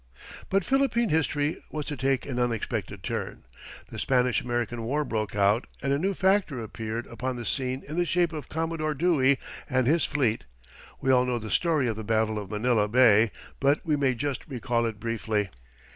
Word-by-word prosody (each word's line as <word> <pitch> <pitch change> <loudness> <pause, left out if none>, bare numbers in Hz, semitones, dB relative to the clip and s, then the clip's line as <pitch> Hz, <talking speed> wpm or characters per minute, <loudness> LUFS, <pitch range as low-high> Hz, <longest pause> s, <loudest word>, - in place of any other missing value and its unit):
But 195 -1 +2
Philippine 265 -4 +2
history 150 -1 0
was 150 -1 -4
to 150 - -3
take 135 -1 0
an 125 -3 -3
unexpected 120 -3 -2
turn. - - -4 0.5
The - - -6
Spanish 125 -2 +2
American 120 -1 -2
war 145 +6 -1
broke 110 -5 -2
out, 105 +3 +3
and 140 0 0
a 140 - +1
new 195 +4 0
factor 190 -8 +2
appeared 115 +1 -4
upon 125 +2 -4
the 120 -1 -6
scene 130 +1 -2
in 155 +3 -5
the 175 - +2
shape 170 -1 +1
of 155 -2 -6
Commodore 160 -1 -2
Dewey 140 -4 +3 0.3
and 130 -2 +2
his 155 +5 +3
fleet. 130 -7 0 0.6
We 135 - +2
all 125 -1 +5
know 125 -1 0
the 110 -2 -6
story 160 -7 +2
of 110 -2 -2
the 110 - -5
battle 110 0 +1
of 100 -2 -7
Manila 110 0 +2
Bay, 110 -1 +5 0.3
but 140 +3 +2
we 155 -2 +2
may 135 -3 +1
just 140 +3 -3
recall 120 -3 -1
it 110 -3 -5
briefly. 110 -2 -1
130 Hz, 190 wpm, -27 LUFS, 115-150 Hz, 0.6 s, all